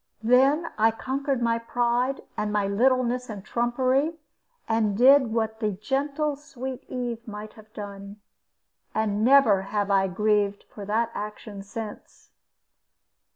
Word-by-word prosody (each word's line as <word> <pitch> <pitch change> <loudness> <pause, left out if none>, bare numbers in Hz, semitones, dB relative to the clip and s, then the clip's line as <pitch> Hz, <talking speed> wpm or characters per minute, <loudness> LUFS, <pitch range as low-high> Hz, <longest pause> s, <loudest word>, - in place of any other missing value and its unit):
Then 270 +8 +4
I 220 +1 +5
conquered 265 +2 -2
my 230 0 +1
pride 245 +3 0
and 210 0 -2
my 210 -1 +1
littleness 250 +4 +1
and 205 -2 -7
trumpery, 260 +7 0 0.5
and 220 -3 +1
did 265 +2 +6
what 220 -1 -1
the 215 -3 0
gentle 280 +7 -1
sweet 265 -3 -7
Eve 240 -2 -4
might 210 0 -8
have 215 0 -17
done. 200 -1 -9 0.8
And 215 -1 0
never 235 -6 +5
have 205 +1 -2
I 195 -1 +3
grieved 205 +1 +1
for 205 - -10
that 225 +3 0
action 210 -1 -7
since. 210 +1 -9
230 Hz, 130 wpm, -26 LUFS, 210-255 Hz, 0.8 s, did